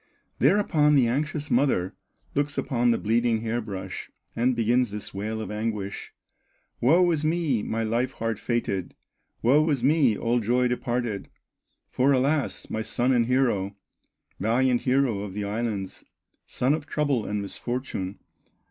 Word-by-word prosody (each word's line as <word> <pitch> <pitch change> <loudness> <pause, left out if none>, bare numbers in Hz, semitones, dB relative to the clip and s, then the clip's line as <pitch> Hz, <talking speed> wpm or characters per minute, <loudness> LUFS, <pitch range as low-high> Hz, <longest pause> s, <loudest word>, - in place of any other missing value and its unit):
Thereupon 155 -7 +4
the 130 -4 +4
anxious 145 +4 -2
mother 120 -8 +2 0.4
Looks 145 0 -1
upon 120 -2 +1
the 115 - +3
bleeding 115 +1 +1
hair 115 +1 -1
brush 100 -4 -6 0.3
And 125 +2 +2
begins 120 +1 +2
this 105 0 -7
wail 110 +3 -3
of 110 - -5
anguish: 105 -2 -4 0.7
"Woe 175 +8 +4
is 155 -2 0
me, 155 -7 +1
my 115 +2 -2
life 120 +4 0
hard 115 -2 -3
fated, 100 -6 -2 0.5
Woe 150 +7 +4
is 135 -5 0
me, 135 -6 +3
all 120 +1 +1
joy 125 +3 +2
departed! 120 -4 -2 0.6
For 135 +2 +3
alas! 135 +2 0
my 110 - -3
son 120 +3 0
and 120 -3 +3
hero, 115 -7 +1 0.6
Valiant 120 +4 +2
hero 130 -5 +1
of 100 -1 -6
the 105 - -2
islands, 105 -2 -3 0.4
Son 130 +3 +1
of 155 -1 -3
trouble 145 -8 0
and 105 0 -1
misfortune! 100 -2 -4
120 Hz, 145 wpm, -26 LUFS, 110-135 Hz, 0.7 s, Thereupon